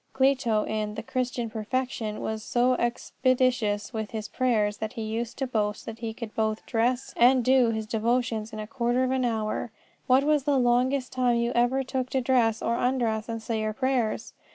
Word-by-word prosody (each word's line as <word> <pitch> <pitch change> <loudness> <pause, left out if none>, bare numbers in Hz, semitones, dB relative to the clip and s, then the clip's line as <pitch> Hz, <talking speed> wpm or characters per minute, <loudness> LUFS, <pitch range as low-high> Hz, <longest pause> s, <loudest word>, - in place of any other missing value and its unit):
Clito 260 -5 +2
in 215 -1 -2
the 220 - -5
Christian 250 -1 -2
Perfection 220 0 -3
was 220 0 -3
so 245 +3 +2
expeditious 245 -2 0
with 220 -2 -3
his 215 -1 -5
prayers 215 -5 +1
that 220 0 -4
he 225 - -4
used 225 +2 -3
to 270 - -1
boast 210 -4 -2
that 225 0 -7
he 225 -1 -3
could 220 -1 -8
both 220 -1 -1
dress 245 +2 0
and 245 0 +5
do 255 -2 +5
his 220 -1 -2
devotions 225 0 -1
in 215 - -7
a 215 - -4
quarter 240 +2 0
of 255 - 0
an 260 -1 +1
hour. 220 0 -1 0.4
What 260 +2 +5
was 295 -2 +2
the 285 -2 +3
longest 250 +2 +2
time 250 -2 +2
you 235 0 0
ever 245 +3 +2
took 260 -1 -3
to 265 - 0
dress 240 -3 +2
or 235 0 +1
undress 235 -3 0
and 225 -1 -4
say 225 -1 -2
your 215 0 -1
prayers? 260 -2 -1
235 Hz, 195 wpm, -27 LUFS, 220-255 Hz, 0.4 s, and